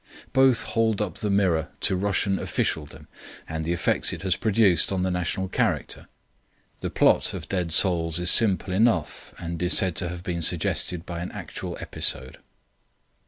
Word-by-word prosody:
Both 130 -2 +4
hold 110 -2 0
up 100 -6 -3
the 105 - -2
mirror 95 -6 +1
to 95 - +2
Russian 100 0 0
officialdom 75 -2 -3 0.4
and 80 0 -4
the 85 - -2
effects 85 -1 0
it - - -7
has 95 -2 +1
produced 100 -6 +2
on 95 -1 -1
the 95 - 0
national 90 +2 -2
character. - - -2 0.7
The - - -4
plot - - +2
of 80 -5 -7
Dead 90 -3 -2
Souls 85 -2 +2
is 90 0 +3
simple 100 -4 +4
enough, 95 -6 0
and 85 0 -6
is 90 +1 +2
said 90 -3 +2
to 90 - 0
have 90 0 -7
been 85 -2 -3
suggested 85 +1 -1
by 85 -1 -6
an 90 - -5
actual - - -7
episode. 65 0 -1
90 Hz, 165 wpm, -25 LUFS, 85-100 Hz, 0.7 s, Both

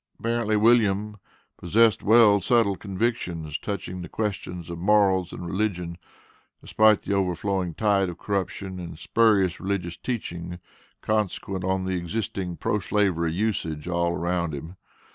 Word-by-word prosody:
Apparently, 115 -2 0
William 105 -2 +3 0.4
possessed 110 +4 +3
well 105 -2 +6
settled 110 -2 +2
convictions, 90 -7 -2
touching 90 -3 -5
the 90 - -8
questions 90 -5 -4
of 85 - -6
morals 95 -2 +3
and 90 - -7
religion, 90 -2 -2 0.6
despite 110 -1 +3
the - - -2
overflowing 95 -2 -1
tide 100 -3 +2
of 85 - -7
corruption 95 -1 -3
and 85 -2 -7
spurious 100 -3 +2
religious 90 -3 -3
teachings 85 -8 -5 0.4
consequent 100 -3 -1
on 95 0 0
the 95 - -1
existing 90 0 -3
pro 110 -2 0
slavery 95 -6 +1
usages 80 -6 -2
all 85 -1 0
around 85 -2 -1
him. 80 +6 -8
95 Hz, 130 wpm, -25 LUFS, 85-105 Hz, 0.6 s, well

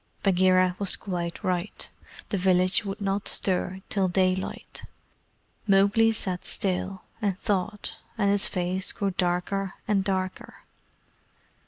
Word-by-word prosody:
Bagheera 185 -1 +4
was 200 -2 +2
quite 175 -3 -4
right; 180 +2 -2 0.4
the 200 - 0
village 185 +1 +3
would 200 +1 -5
not 195 +1 -1
stir 190 0 +1
till 195 -2 +1
daylight. 185 +1 -1 0.8
Mowgli 200 +3 +5
sat 185 -5 -2
still, 190 0 -2 0.2
and 200 -3 0
thought, 205 0 -2 0.2
and 200 -2 +3
his 200 0 +4
face 185 +1 -1
grew 200 -1 -1
darker 185 +2 -1
and 200 -2 +2
darker. 190 -1 -3
190 Hz, 120 wpm, -26 LUFS, 185-200 Hz, 0.8 s, Mowgli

